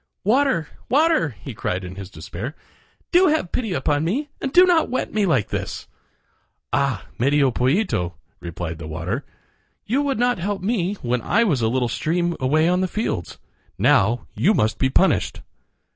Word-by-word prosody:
"Water! 220 Hz, -, +2 dB, 0.2 s
water!" 300 Hz, -, +3 dB
he 135 Hz, -, -6 dB
cried 95 Hz, -3 st, -3 dB
in 90 Hz, +1 st, -7 dB
his 95 Hz, -1 st, -8 dB
despair, 100 Hz, -, -7 dB, 0.6 s
"do 360 Hz, +2 st, +5 dB
have 300 Hz, -, +1 dB
pity 225 Hz, -5 st, -2 dB
upon 150 Hz, -4 st, 0 dB
me 260 Hz, -, -1 dB
and 270 Hz, -, -2 dB
do 360 Hz, +5 st, +7 dB
not 345 Hz, -3 st, +3 dB
wet 255 Hz, -, -2 dB
me 210 Hz, -2 st, +2 dB
like 130 Hz, -, +1 dB
this." -, -, -4 dB, 0.9 s
"Ah! 130 Hz, -9 st, 0 dB
Medio 140 Hz, +1 st, +3 dB
Pollito," 125 Hz, -, 0 dB, 0.2 s
replied 85 Hz, -1 st, -6 dB
the 80 Hz, -, -7 dB
water, 85 Hz, -, -3 dB, 0.6 s
"you 260 Hz, +6 st, +1 dB
would 280 Hz, -2 st, -1 dB
not 245 Hz, -2 st, +1 dB
help 195 Hz, +1 st, -3 dB
me 200 Hz, -2 st, 0 dB
when 125 Hz, 0 st, 0 dB
I 230 Hz, -, +2 dB
was 155 Hz, -, +1 dB
a 110 Hz, -, +2 dB
little 125 Hz, 0 st, +1 dB
stream 170 Hz, +8 st, -1 dB
away 155 Hz, +5 st, +2 dB
on 180 Hz, +1 st, +2 dB
the 185 Hz, -, +1 dB
fields. 180 Hz, -, -3 dB, 0.4 s
Now 110 Hz, +4 st, +3 dB
you 210 Hz, +3 st, +2 dB
must 110 Hz, +1 st, +1 dB
be 130 Hz, -, +2 dB
punished." -, -, +1 dB
160 Hz, 170 wpm, -22 LUFS, -, 0.9 s, do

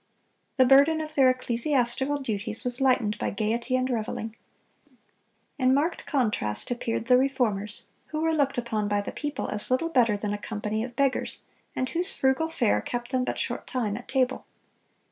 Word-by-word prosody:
The 260 Hz, -, +6 dB
burden 280 Hz, +5 st, +6 dB
of 310 Hz, 0 st, -5 dB
their 270 Hz, -3 st, +5 dB
ecclesiastical 255 Hz, +2 st, 0 dB
duties 220 Hz, -4 st, -3 dB
was 250 Hz, +1 st, +3 dB
lightened 250 Hz, -5 st, +2 dB
by -, -, -1 dB
gaiety 230 Hz, +5 st, -1 dB
and 255 Hz, 0 st, +1 dB
reveling. 225 Hz, -2 st, -3 dB, 1.2 s
In 260 Hz, 0 st, +4 dB
marked 320 Hz, +5 st, -1 dB
contrast 215 Hz, -, 0 dB
appeared 230 Hz, -2 st, -2 dB
the 250 Hz, +1 st, +5 dB
Reformers, 235 Hz, -6 st, 0 dB, 0.2 s
who 310 Hz, +1 st, -3 dB
were 325 Hz, 0 st, +2 dB
looked 280 Hz, -4 st, +1 dB
upon 220 Hz, -3 st, -1 dB
by 205 Hz, 0 st, +1 dB
the -, -, -5 dB
people 295 Hz, -1 st, -4 dB
as 210 Hz, -, -2 dB
little 260 Hz, +6 st, +1 dB
better 235 Hz, -8 st, +3 dB
than 205 Hz, 0 st, -3 dB
a 205 Hz, -, -4 dB
company 215 Hz, 0 st, -3 dB
of 240 Hz, 0 st, -7 dB
beggars, 275 Hz, 0 st, 0 dB, 0.3 s
and 255 Hz, -, -1 dB
whose 350 Hz, +3 st, 0 dB
frugal 265 Hz, +5 st, +1 dB
fare 245 Hz, -9 st, +1 dB
kept 240 Hz, 0 st, -5 dB
them 255 Hz, -1 st, +1 dB
but -, -, -2 dB
short -, -, -3 dB
time 225 Hz, -6 st, -1 dB
at 245 Hz, -, -8 dB
table. 265 Hz, -1 st, 0 dB
250 Hz, 175 wpm, -27 LUFS, 220-270 Hz, 1.2 s, The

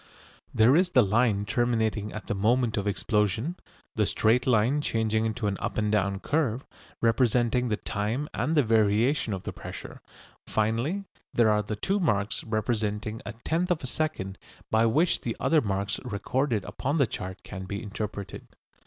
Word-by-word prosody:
There 115 Hz, +5 st, +5 dB
is 180 Hz, +2 st, +4 dB
the 125 Hz, -8 st, +5 dB
line 105 Hz, 0 st, +2 dB
terminating 110 Hz, -3 st, 0 dB
at 110 Hz, -, -7 dB
the 120 Hz, -, -2 dB
moment 110 Hz, +3 st, +2 dB
of 100 Hz, 0 st, -2 dB
explosion; 105 Hz, -, 0 dB, 0.4 s
the -, -, +2 dB
straight 125 Hz, +4 st, +2 dB
line 125 Hz, +4 st, +3 dB
changing 110 Hz, -3 st, 0 dB
into 110 Hz, 0 st, -3 dB
an 100 Hz, -1 st, 0 dB
up -, -, -3 dB
and 105 Hz, -1 st, +1 dB
down 100 Hz, -1 st, +1 dB
curve, 135 Hz, -5 st, 0 dB, 0.4 s
representing 120 Hz, +1 st, +2 dB
the 105 Hz, -, 0 dB
time 110 Hz, +8 st, -2 dB
and 160 Hz, +1 st, 0 dB
the 145 Hz, -, +6 dB
variation 110 Hz, +3 st, +2 dB
of 95 Hz, -2 st, -3 dB
the -, -, -5 dB
pressure; -, -, -9 dB, 0.5 s
finally 115 Hz, -, 0 dB, 0.3 s
there 115 Hz, -2 st, +5 dB
are 105 Hz, 0 st, +3 dB
the 105 Hz, +1 st, -4 dB
two 195 Hz, -, 0 dB
marks 105 Hz, -, 0 dB
representing 110 Hz, -1 st, -2 dB
a 100 Hz, -, -4 dB
tenth 170 Hz, +3 st, 0 dB
of 175 Hz, -5 st, 0 dB
a -, -, -2 dB
second 125 Hz, -10 st, -3 dB, 0.3 s
by 110 Hz, +1 st, +4 dB
which 155 Hz, +10 st, +2 dB
the 115 Hz, -, -3 dB
other 160 Hz, -2 st, +3 dB
marks 100 Hz, -2 st, -2 dB
recorded 120 Hz, 0 st, -1 dB
upon 140 Hz, -, -2 dB
the 140 Hz, -, +4 dB
chart 95 Hz, -4 st, -6 dB
can 95 Hz, -2 st, -7 dB
be 100 Hz, +1 st, -5 dB
interpreted. 100 Hz, -1 st, -6 dB
110 Hz, 170 wpm, -27 LUFS, 105-125 Hz, 0.5 s, the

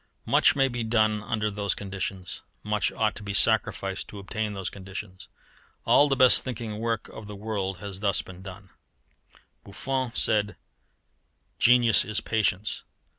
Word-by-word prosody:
Much -, -, +4 dB
may 135 Hz, -1 st, +3 dB
be 120 Hz, -2 st, -3 dB
done 110 Hz, -2 st, +1 dB
under 105 Hz, 0 st, -2 dB
those 100 Hz, 0 st, -1 dB
conditions. 95 Hz, -2 st, -6 dB, 0.2 s
Much -, -, 0 dB
ought -, -, 0 dB
to -, -, -7 dB
be 100 Hz, -1 st, -3 dB
sacrificed 95 Hz, 0 st, +1 dB
to 105 Hz, -, -10 dB
obtain 105 Hz, +2 st, -4 dB
those 95 Hz, -2 st, -5 dB
conditions. 95 Hz, -1 st, -9 dB, 0.6 s
All 145 Hz, 0 st, +5 dB
the 135 Hz, -, +2 dB
best 130 Hz, -1 st, +7 dB
thinking 115 Hz, -4 st, -5 dB
work 115 Hz, -1 st, -2 dB
of 105 Hz, -, -10 dB
the 105 Hz, -, -8 dB
world 100 Hz, -3 st, -3 dB
has 95 Hz, 0 st, -7 dB
been -, -, -16 dB
thus 100 Hz, -2 st, +1 dB, 0.2 s
done. 95 Hz, +1 st, -11 dB, 0.9 s
Buffon 130 Hz, +4 st, -3 dB
said: 105 Hz, -1 st, +1 dB, 1.0 s
"Genius 120 Hz, -2 st, +5 dB
is 110 Hz, 0 st, -1 dB
patience." 110 Hz, -2 st, -1 dB
105 Hz, 150 wpm, -26 LUFS, 100-115 Hz, 1.0 s, best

